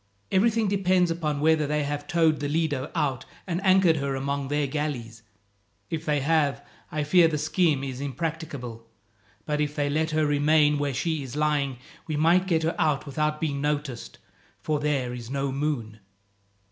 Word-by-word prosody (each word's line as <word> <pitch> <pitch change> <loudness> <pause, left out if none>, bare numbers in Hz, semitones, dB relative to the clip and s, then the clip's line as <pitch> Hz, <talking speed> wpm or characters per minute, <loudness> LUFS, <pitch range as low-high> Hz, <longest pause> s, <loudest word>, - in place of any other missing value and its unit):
Everything 220 +3 +3
depends 185 -3 +2
upon 155 -3 -2
whether 155 -1 +3
they 150 0 0
have 145 0 -4
towed 165 -4 +2
the 145 -1 -2
Lido 150 -4 -1
out 135 -4 0 0.2
and 180 +1 -3
anchored 185 -4 +5
her 140 -1 -1
among 140 +1 -2
their 145 +1 0
galleys. 130 -6 -4 0.7
If 165 0 -3
they 150 -2 +1
have, 145 -2 +1 0.3
I 155 -1 -1
fear 170 +3 +5
the 155 -2 -1
scheme 155 -2 +1
is 130 -1 -5
impracticable, 140 -6 -5 0.6
but 150 0 -1
if 150 0 -2
they 145 -1 0
let 160 +2 +1
her 155 0 +1
remain 150 0 +3
where 140 -2 -1
she 160 +2 -1
is 135 -1 -7
lying, 150 -3 0 0.3
we 155 - -2
might 170 +5 +3
get 165 -3 +1
her 165 - +1
out 150 -3 +1
without 150 +2 -1
being 145 -3 -2
noticed, 145 -4 -3 0.5
for 155 -1 0
there 140 -4 -1
is 120 -2 -7
no 140 0 -1
moon." 130 -6 -3
150 Hz, 170 wpm, -26 LUFS, 140-160 Hz, 0.7 s, anchored